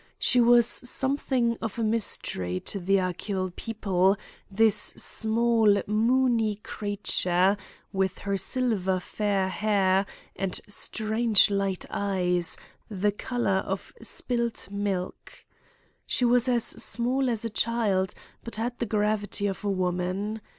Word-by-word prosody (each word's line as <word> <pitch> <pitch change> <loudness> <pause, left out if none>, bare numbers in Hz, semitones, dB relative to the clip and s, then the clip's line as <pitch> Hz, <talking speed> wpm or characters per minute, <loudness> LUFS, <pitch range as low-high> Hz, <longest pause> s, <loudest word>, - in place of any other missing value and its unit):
She 250 - +4
was 240 0 +6
something 255 -1 +1
of 225 -1 -4
a 230 - -1
mystery 145 - -1
to 200 - -3
the 195 +2 +2
Achill 185 +1 -2
people, 195 -3 0 0.3
this 215 +1 +4 0.2
small 225 -2 +2
moony 225 0 +2
creature, 200 -2 +1 0.4
with 190 -1 -1
her 200 0 -3
silver 195 -3 0
fair 200 0 -1
hair, 195 -1 +1 0.3
and 190 -1 -2
strange 220 0 +2
light 195 -2 -1
eyes, 180 -4 0 0.3
the 205 0 0
colour 210 -2 -1
of 195 0 -5
spilt 235 -5 -3
milk. 200 -3 -4 0.6
She 250 - +2
was 245 +1 +3
as 240 -2 +2
small 255 +2 +2
as 230 -1 -2
a 230 - -3
child, 210 -4 0 0.3
but 230 - -4
had 235 +3 -4
the 235 - -2
gravity 205 -1 0
of 195 -1 -3
a 205 - -1
woman. 185 +3 -2
205 Hz, 120 wpm, -26 LUFS, 190-230 Hz, 0.6 s, was